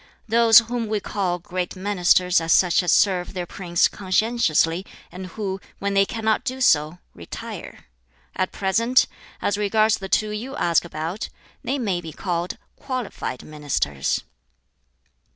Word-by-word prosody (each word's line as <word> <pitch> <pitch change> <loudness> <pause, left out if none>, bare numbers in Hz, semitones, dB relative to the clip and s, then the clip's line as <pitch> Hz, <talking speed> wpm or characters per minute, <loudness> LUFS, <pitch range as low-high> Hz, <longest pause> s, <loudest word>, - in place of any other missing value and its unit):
Those 225 0 +6
whom 235 0 +3
we 215 0 0
call 190 -3 -2
'great 180 +1 -4
ministers' 180 -2 +3
are 165 - -5
such 180 +2 +4
as 180 - +1
serve 185 -1 +2
their 180 -1 -3
prince 175 -1 +1
conscientiously, 185 -4 +1 0.3
and 185 +2 -7
who, 195 0 -4 0.2
when 200 0 -2
they 195 0 +4
cannot 220 -1 0
do 260 +1 -3
so, 155 - +3 0.2
retire. 85 - -9 0.5
At 185 - -1
present, 230 +6 +2 0.4
as 205 0 0
regards 215 +1 +2
the 195 -1 -7
two 215 +2 +1
you 240 +6 -5
ask 170 - +2
about, 165 +4 -5 0.3
they 270 +3 -1
may 195 -9 -1
be 160 -2 -8
called 175 0 -3 0.2
'qualified 250 - -5
ministers.'" 140 - -2
190 Hz, 140 wpm, -23 LUFS, 175-220 Hz, 0.5 s, Those